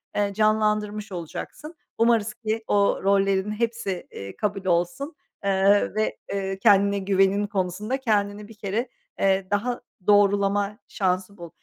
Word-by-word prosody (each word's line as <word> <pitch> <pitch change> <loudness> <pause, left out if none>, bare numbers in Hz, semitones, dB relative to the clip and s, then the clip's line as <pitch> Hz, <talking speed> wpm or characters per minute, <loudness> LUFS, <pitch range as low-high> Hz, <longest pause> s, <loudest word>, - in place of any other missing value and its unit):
eee, 205 -1 0
canlandırmış 215 0 +1
olacaksın. 185 - -7 0.2
Umarız 230 -2 +2
ki, 220 0 -3
o 200 -1 +2
rollerin 195 0 +2
hepsi, 225 -4 -2
eee, 100 0 -8
kabul 200 -2 -2
olsun, 175 - 0 0.3
eee, 200 +1 +3
ve, 215 0 0 0.2
eee, 195 -1 -3
kendine 200 -1 +4
güvenin 195 +1 +2
konusunda 200 +5 -2
kendini 210 -4 -1
bir 225 - -13
kere, 215 +4 -3 0.3
eee, 195 -1 +2
daha 240 +5 -1 0.3
doğrulama 205 0 +3
şansı 190 +1 -1
bul. 170 -2 -9
205 Hz, 130 wpm, -25 LUFS, 195-215 Hz, 0.3 s, kendine